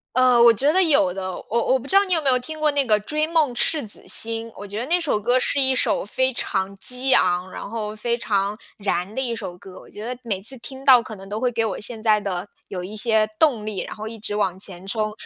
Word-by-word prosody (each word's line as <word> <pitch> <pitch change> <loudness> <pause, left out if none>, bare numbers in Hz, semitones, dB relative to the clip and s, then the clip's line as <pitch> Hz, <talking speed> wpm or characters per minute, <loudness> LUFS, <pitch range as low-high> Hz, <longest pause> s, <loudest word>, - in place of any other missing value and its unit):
呃， 255 -2 +5
我 235 0 +8
觉 275 +7 +2
得 375 - +4
有 280 - +4
的。 185 0 -4 0.2
我 235 +1 0
我 265 - +4
不 260 - -11
知 380 - -3
道 395 +1 +6
你 370 - -3
有 330 - +3
没 275 - +1
有 255 - +4
听 310 +5 -8
过 305 -1 +3
那 280 -1 +2
个 215 -3 +3
《追 305 +5 0
梦 315 -6 +1
赤 290 +1 0
子 205 - -5
星》， 225 0 +1
我 205 - -8
觉 205 +1 -6
得 245 - -3
那 350 +3 +2
首 290 -10 0
歌 245 +4 +2
是 280 +2 0
一 265 -1 +4
首 - - 0
非 260 +6 0
常 195 -4 -3
激 250 +5 +2
昂， 180 +1 +2
然 - - -7
后 215 -1 -4
非 235 +2 -1
常 200 -2 -1 0.2
燃 200 -1 -2
的 265 - -2
一 235 -3 -2
首 175 - -7
歌。 190 -1 -12
我 - - -15
觉 210 - -9
得 245 +1 -5
每 200 -5 -2
次 245 +6 -5
听 265 +3 -10
到 255 -3 +7
可 220 - -8
能 195 0 -12
都 210 +2 -4
会 250 +1 0
给 225 -1 0
我 220 - -3
现 220 +1 -5
在 215 -2 +4
的 195 -1 -4 0.2
有 185 -2 -5
一 205 +4 -7
些 220 -1 +2
动 260 -9 +2
力， 210 -3 -3
然 - - -7
后 215 +1 -6
一 225 0 -9
直 205 -1 -4
往 190 -3 -1
前 190 -2 -5
冲。 215 +1 -2
225 Hz, 290 characters per minute, -22 LUFS, 205-260 Hz, 0.2 s, 我